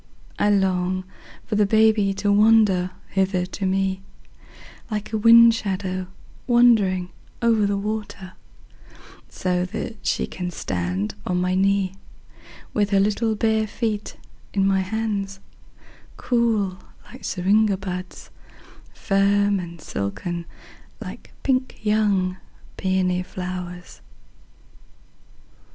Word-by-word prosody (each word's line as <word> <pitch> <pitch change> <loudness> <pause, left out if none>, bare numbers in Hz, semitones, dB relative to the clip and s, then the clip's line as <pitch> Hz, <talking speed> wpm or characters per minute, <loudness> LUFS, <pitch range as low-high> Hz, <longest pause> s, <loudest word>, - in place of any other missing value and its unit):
I 205 - +3
long 185 -2 +1 0.4
for - - -5
the 210 -1 +3
baby 220 -1 +4
to 205 +1 0
wander 205 -3 +4 0.2
hither 190 -2 0
to 190 +2 -5
meLike 195 +3 -5
a - - +2
wind 230 +1 +8
shadow 190 -3 -3 0.4
wandering 220 -7 +4 0.3
over 225 -3 +3
the 200 0 0
water, 205 -2 -5 1.0
So 180 -1 -1
that 215 +4 -5
she - - 0
can 180 -1 -5
stand 95 - -3
on 180 - -1
my 180 0 0
kneeWith 195 +1 -2
her 200 -1 +3
little 215 +2 +1
bare 220 0 +1
feet 215 -1 -3 0.4
in 195 -1 +3
my 195 0 +3
hands, 200 -1 -2 0.8
Cool 220 -6 0 0.3
like - - -12
syringa 200 +2 +2
buds, 185 -1 -7 0.6
Firm 200 0 +2
and 170 -1 -8
silken 170 - -4 0.5
like - - -9
pink 255 -1 0
young 205 -4 +1 0.4
peony 185 -1 0
flowers. 180 -1 -7
195 Hz, 105 wpm, -23 LUFS, 185-215 Hz, 1.0 s, wind